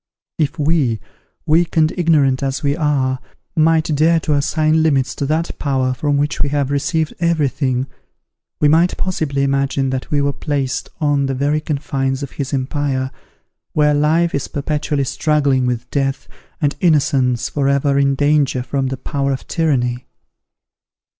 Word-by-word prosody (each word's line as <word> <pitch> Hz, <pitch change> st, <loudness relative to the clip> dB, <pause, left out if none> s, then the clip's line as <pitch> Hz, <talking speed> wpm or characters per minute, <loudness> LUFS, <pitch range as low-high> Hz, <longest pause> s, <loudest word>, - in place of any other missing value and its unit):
If 150 Hz, -1 st, 0 dB
we, 145 Hz, -7 st, +1 dB, 0.5 s
weak 165 Hz, +2 st, +2 dB
and 155 Hz, -1 st, +3 dB
ignorant 150 Hz, -7 st, +2 dB
as 135 Hz, +2 st, -2 dB
we 140 Hz, 0 st, +1 dB
are, 140 Hz, -5 st, 0 dB, 0.4 s
might 160 Hz, 0 st, +3 dB
dare 165 Hz, +3 st, +3 dB
to 150 Hz, -, 0 dB
assign 155 Hz, +2 st, +2 dB
limits 135 Hz, -4 st, +1 dB
to 140 Hz, -, -3 dB
that 160 Hz, +3 st, -2 dB
Power 130 Hz, -2 st, 0 dB
from 145 Hz, +2 st, 0 dB
whom 145 Hz, +1 st, +2 dB
we 145 Hz, -, +2 dB
have 140 Hz, -1 st, -1 dB
received 155 Hz, +2 st, 0 dB
every 170 Hz, -4 st, +2 dB
thing, 130 Hz, -2 st, -1 dB, 0.7 s
we 150 Hz, -, +4 dB
might 165 Hz, +4 st, +3 dB
possibly 155 Hz, -7 st, -1 dB
imagine 140 Hz, -1 st, 0 dB
that 130 Hz, -1 st, -4 dB
we 145 Hz, -, +1 dB
were 140 Hz, 0 st, +1 dB
placed 135 Hz, -3 st, -2 dB
on 145 Hz, -2 st, +1 dB
the 135 Hz, -, -2 dB
very 145 Hz, +3 st, 0 dB
confines 135 Hz, -2 st, -2 dB
of 140 Hz, -, -6 dB
his 140 Hz, -2 st, -4 dB
empire, 135 Hz, -1 st, -1 dB, 0.6 s
where 150 Hz, -1 st, +3 dB
life 160 Hz, +4 st, +2 dB
is 140 Hz, -, -2 dB
perpetually 145 Hz, 0 st, -2 dB
struggling 140 Hz, -2 st, +1 dB
with 125 Hz, -1 st, -2 dB
death, 135 Hz, -1 st, -1 dB, 0.3 s
and 145 Hz, -4 st, 0 dB
innocence 135 Hz, -7 st, +2 dB
for 140 Hz, -2 st, -1 dB
ever 140 Hz, 0 st, +2 dB
in 140 Hz, 0 st, +2 dB
danger 145 Hz, -3 st, +2 dB
from 135 Hz, +1 st, -1 dB
the 130 Hz, 0 st, -3 dB
power 140 Hz, +1 st, -2 dB
of 135 Hz, -, -4 dB
tyranny! 125 Hz, -6 st, 0 dB
140 Hz, 160 wpm, -18 LUFS, 135-155 Hz, 0.7 s, we